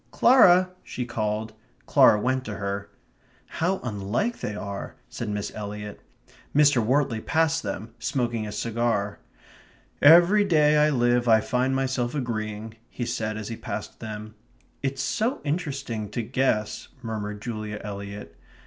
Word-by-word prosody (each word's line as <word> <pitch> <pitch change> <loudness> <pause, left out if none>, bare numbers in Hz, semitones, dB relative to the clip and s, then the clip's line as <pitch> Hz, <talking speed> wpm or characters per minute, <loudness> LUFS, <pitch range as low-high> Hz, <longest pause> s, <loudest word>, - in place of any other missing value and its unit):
"Clara!" 185 -8 +6
she 125 - -5
called. 110 -1 -2 0.3
Clara 105 - +6
went 130 +3 0
to 105 - -5
her. 100 0 -4 0.6
"How 185 +4 -1
unlike 110 - -2
they 105 - -4
are!" 100 -1 -6
said 115 - -5
Miss 105 -1 -3
Eliot. 105 0 -7 0.5
Mr. 145 -5 +5
Wortley 125 -1 +1
passed 160 0 +1
them, 105 +2 -5
smoking 120 -4 -1
a - - -5
cigar. 115 -3 -1 0.8
"Every 175 +7 +7
day 150 -5 +4
I 150 0 +5
live 120 -3 +2
I 110 -1 +6
find 130 +3 0
myself 130 -1 -1
agreeing 110 -4 -4
..." 120 - -37
he 120 - -4
said 110 -2 -2
as 110 0 -5
he 115 - -4
passed - - -6
them. 110 -1 -7 0.5
"It's 135 -1 -2
so 230 - 0
interesting 140 - -3
to 115 +3 -3
guess 120 -3 -1
..." 130 - -28
murmured 105 -2 -4
Julia 110 -2 -5
Eliot. 100 -4 -7
115 Hz, 145 wpm, -25 LUFS, 105-140 Hz, 0.8 s, Every